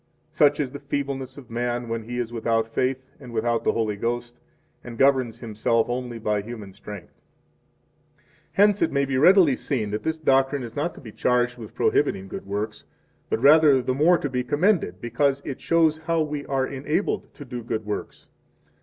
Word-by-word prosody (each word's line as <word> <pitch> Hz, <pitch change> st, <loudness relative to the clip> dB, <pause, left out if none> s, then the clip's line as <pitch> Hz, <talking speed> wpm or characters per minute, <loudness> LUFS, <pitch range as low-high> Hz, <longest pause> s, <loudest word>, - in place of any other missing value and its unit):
Such 145 Hz, -2 st, +3 dB
is 140 Hz, -4 st, -1 dB
the 140 Hz, -, -7 dB
feebleness 140 Hz, -2 st, -4 dB
of 125 Hz, -5 st, -12 dB
man 120 Hz, +1 st, -2 dB
when 115 Hz, 0 st, -3 dB
he 120 Hz, +1 st, -5 dB
is 120 Hz, -1 st, -3 dB
without 115 Hz, -1 st, 0 dB
faith 130 Hz, +3 st, -1 dB
and 125 Hz, -4 st, -11 dB
without 115 Hz, 0 st, 0 dB
the -, -, +2 dB
Holy 110 Hz, -2 st, -1 dB
Ghost, 120 Hz, +2 st, -3 dB, 0.4 s
and 120 Hz, -1 st, -9 dB
governs 130 Hz, -3 st, +3 dB
himself 115 Hz, +1 st, 0 dB
only 120 Hz, -1 st, -3 dB
by 105 Hz, -2 st, -1 dB
human 105 Hz, -3 st, -9 dB
strength. 100 Hz, -3 st, -11 dB, 0.9 s
35 -, -, -35 dB, 0.3 s
Hence 205 Hz, 0 st, +4 dB
it 165 Hz, -, +2 dB
may 140 Hz, 0 st, +1 dB
be 130 Hz, -1 st, 0 dB
readily 175 Hz, -3 st, +6 dB
seen 110 Hz, -8 st, -2 dB
that 105 Hz, -, -2 dB
this 160 Hz, 0 st, -2 dB
doctrine 135 Hz, -2 st, +2 dB
is 115 Hz, -1 st, -8 dB
not 155 Hz, +4 st, -2 dB
to -, -, -12 dB
be 115 Hz, -6 st, -10 dB
charged 125 Hz, +2 st, +1 dB
with 110 Hz, -3 st, -10 dB
prohibiting 95 Hz, 0 st, +1 dB
good 95 Hz, -, -8 dB
works, 105 Hz, +2 st, -4 dB, 0.5 s
but 115 Hz, -, -1 dB
rather 150 Hz, -1 st, +7 dB
the 130 Hz, 0 st, -1 dB
more 160 Hz, +6 st, +4 dB
to 145 Hz, -, -3 dB
be 125 Hz, -2 st, -2 dB
commended, 145 Hz, -, +1 dB
because 135 Hz, +4 st, +1 dB
it 135 Hz, -, -5 dB
shows 165 Hz, -2 st, +3 dB
how 165 Hz, 0 st, 0 dB
we 150 Hz, -1 st, -5 dB
are 135 Hz, -1 st, 0 dB
enabled 150 Hz, +8 st, -2 dB
to 145 Hz, -, -10 dB
do 125 Hz, -1 st, -6 dB
good 110 Hz, -1 st, -4 dB
works. 105 Hz, -, -6 dB
125 Hz, 190 wpm, -24 LUFS, 115-145 Hz, 0.9 s, rather